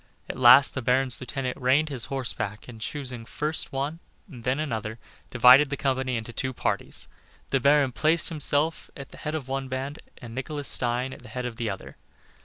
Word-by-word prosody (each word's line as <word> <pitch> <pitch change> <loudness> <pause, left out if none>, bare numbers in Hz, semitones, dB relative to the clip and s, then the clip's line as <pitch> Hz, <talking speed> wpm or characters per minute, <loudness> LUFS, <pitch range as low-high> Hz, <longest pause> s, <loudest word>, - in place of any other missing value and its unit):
At - - -5
last 130 +3 +8
the 130 - -3
Baron's 125 +1 +1
lieutenant 130 0 -3
reined 140 +5 +3
his 130 -5 -3
horse 135 -3 -3
back, 110 -2 -5
and 115 -3 -11
choosing 125 -2 -3
first 150 +6 -1
one 140 +4 -3 0.3
and 125 - -12
then 130 +4 0
another, 110 -7 -3 0.3
divided 130 +4 +7
the 140 - -3
company 130 -2 0
into 115 +1 -6
two 130 +2 0
parties. - - -2 0.4
The 135 - +3
baron 140 0 +4
placed 155 +6 +2
himself 155 0 -1
at 140 -1 -9
the - - -12
head 150 0 -3
of 140 -5 -5
one 135 0 -3
band 135 +3 -4 0.2
and 115 -2 -10
Nicholas 145 +3 -5
Stein 125 +2 0
at - - -12
the 120 - -13
head 125 +2 -4
of 120 -2 -5
the 115 -2 -2
other. 95 -1 -7
130 Hz, 200 wpm, -26 LUFS, 120-140 Hz, 0.4 s, last